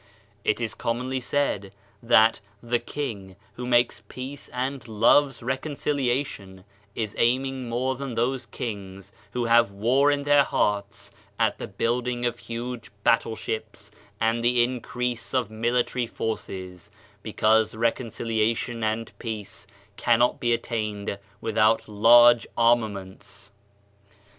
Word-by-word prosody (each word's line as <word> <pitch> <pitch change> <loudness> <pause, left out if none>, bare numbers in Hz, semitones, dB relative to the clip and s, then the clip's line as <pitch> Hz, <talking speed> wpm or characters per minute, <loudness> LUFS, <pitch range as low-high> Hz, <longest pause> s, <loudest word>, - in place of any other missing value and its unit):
It 105 - +1
is 115 -3 -2
commonly 125 +3 -2
said 110 -7 -1 0.3
that 115 -1 +5 0.2
"the 120 0 +1
king, 105 -12 -6 0.2
who 125 0 -6
makes 120 0 +2
peace 135 +2 -7
and 130 0 -4
loves 120 +5 +3
reconciliation, 130 -7 -2 0.3
is 110 -2 -3
aiming 130 +1 +1
more 130 +3 -1
than 135 -2 -5
those 125 +2 -1
kings 100 -5 -7 0.2
who 125 -1 -1
have 115 -1 +5
war 120 +8 +2
in 145 -1 +1
their 145 0 +5
hearts 100 -6 -1 0.3
at - - +1
the - - -5
building 120 +1 -1
of 120 - -1
huge 120 +1 -6
battleships 110 -1 -1 0.3
and 115 +1 +1
the 120 0 +4
increase 125 -1 -3
of 120 -4 0
military 120 +2 0
forces, 95 -5 -5 0.3
because 110 +1 +2
reconcilia 115 -1 0
tion 115 -2 -4
and 110 +1 -1
peace 105 -3 -6 0.3
cannot 120 +1 +3
be 120 - 0
attained 105 -4 -2 0.2
without 110 0 +2
large 120 +3 +6
armaments." 105 -4 0
115 Hz, 120 wpm, -25 LUFS, 110-125 Hz, 0.3 s, large